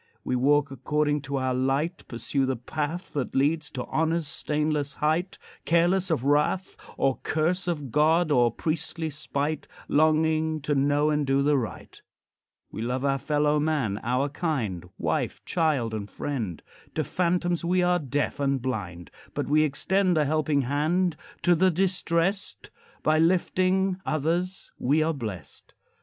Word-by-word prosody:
We 130 - -1
walk 140 +3 +3
according 150 +3 0
to 140 - -1
our 130 -1 0
light, 135 +7 -1
Pursue 130 +3 -1
the 130 - 0
path 155 +8 -4
That 140 -4 -3
leads 150 +3 +1
to 125 -2 -5
honor's 160 0 0
stainless 150 -1 -1
height, 160 +5 0 0.3
Careless 175 +3 +2
of 150 -6 0
wrath 150 +6 +1 0.2
Or 135 -1 +1
curse 175 +4 0
of 150 -7 -3
God, 160 +3 +3
or 120 -4 +4
priestly 160 +3 -3
spite, 145 +1 -3 0.2
Longing 155 +1 +2
to 150 +1 -1
know 145 +2 +2
and 150 -2 0
do 135 +1 +2
the 145 +1 +3
right. 120 -5 -5 0.7
We 110 - -6
love 125 +3 -2
our 135 -1 +1
fellow 150 +1 +1
man, 145 -10 0
our 125 +4 0
kind, 125 - -3
Wife, - - -2
child, 150 -10 +1
and 105 -2 -4
friend. 115 - -4 0.3
To 155 - +1
phantoms 175 +3 0
we 180 +1 +2
are 180 0 +3
deaf 145 -1 -2
and 140 -1 +1
blind, 95 -9 -4 0.2
But - - -1
we 150 +2 +4
extend 180 +5 +2
The 150 - +3
helping 150 -1 +1
hand 155 +7 +1 0.3
to 175 - +5
the 185 +3 +4
distressed; 185 +1 0 0.3
By 155 0 +3
lifting 185 +2 +2
others 170 +5 -1
we 150 +5 +2
are 165 +1 +1
blessed. 110 - -7
150 Hz, 150 wpm, -26 LUFS, 135-165 Hz, 0.7 s, to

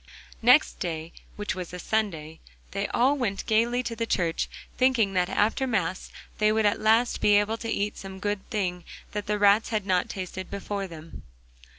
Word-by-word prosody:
Next 250 +6 +5
day, 165 -2 -4 0.2
which 210 0 -3
was 180 -2 -6
a - - -5
Sunday, 170 -7 -2 0.3
they 200 +1 -2
all 260 +4 +3
went 220 -8 -2
gaily 235 +3 +2
to 230 -1 -3
church, 170 -5 0 0.3
thinking 250 -6 +3
that 180 -1 +1
after 225 +6 +1
Mass 190 -6 -1 0.3
they 215 0 +4
would 220 0 +2
at 205 - +2
last 225 +3 +3
be 205 - +5
able 205 +2 +2
to 230 - -5
eat 205 -1 -1
some 190 0 -8
good 205 0 -3
thing 180 -4 -2 0.3
that 205 0 -4
the 210 0 +1
rats 205 +2 +4
had 215 -3 -1
not 185 -2 +1
tasted 185 0 -6
before 200 0 -4
them. 165 -2 -11
205 Hz, 180 wpm, -27 LUFS, 185-220 Hz, 0.3 s, Next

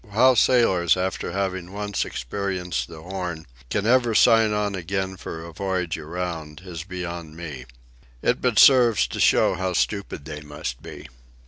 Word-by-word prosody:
How 130 +5 +6
sailors, 95 -9 +3
after 95 -1 -2
having 95 -1 -3
once 105 0 -2
experienced 90 -2 -3
the 80 -1 -11
Horn, 90 -3 -5 0.2
can 100 - -1
ever 120 -1 +3
sign 115 -1 +5
on 105 -1 -1
again 95 +1 -3
for 80 -2 -7
a 85 - -10
voyage 90 -2 -2
around 80 0 -6
is 85 -3 -6
beyond 85 -3 -6
me. 75 -7 -7 0.6
It 125 - +1
but 125 -4 +1
serves 120 -7 +6
to - - -6
show - - +4
how 95 0 -2
stupid 100 -6 -2
they 75 -1 -7
must 75 -5 -6
be. - - -10
90 Hz, 155 wpm, -24 LUFS, 80-100 Hz, 0.6 s, How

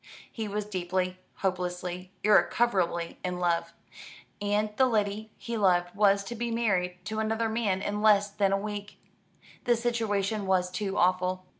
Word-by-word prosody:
He 220 -2 -4
was 210 +1 -3
deeply, 185 -1 -2 0.3
hopelessly, 180 0 -3
irrecoverably 195 -5 +2
in 180 0 -2
love; 170 -1 0 0.7
and 210 +1 0
the 260 +2 +4
lady 215 -2 -1
he 235 -1 -4
loved 175 -3 +2
was 200 -1 +3
to 220 - -6
be 235 +1 -3
married 195 -6 0
to 220 0 -3
another 220 +1 0
man 210 -4 0
in 205 0 -2
less 205 -2 +5
than 200 -1 +1
a 195 - +3
week. 205 0 -6 0.7
The 240 - +4
situation 220 -4 -1
was 180 -1 +2
too 195 +1 -3
awful. 185 +1 +1
200 Hz, 150 wpm, -28 LUFS, 185-215 Hz, 0.7 s, less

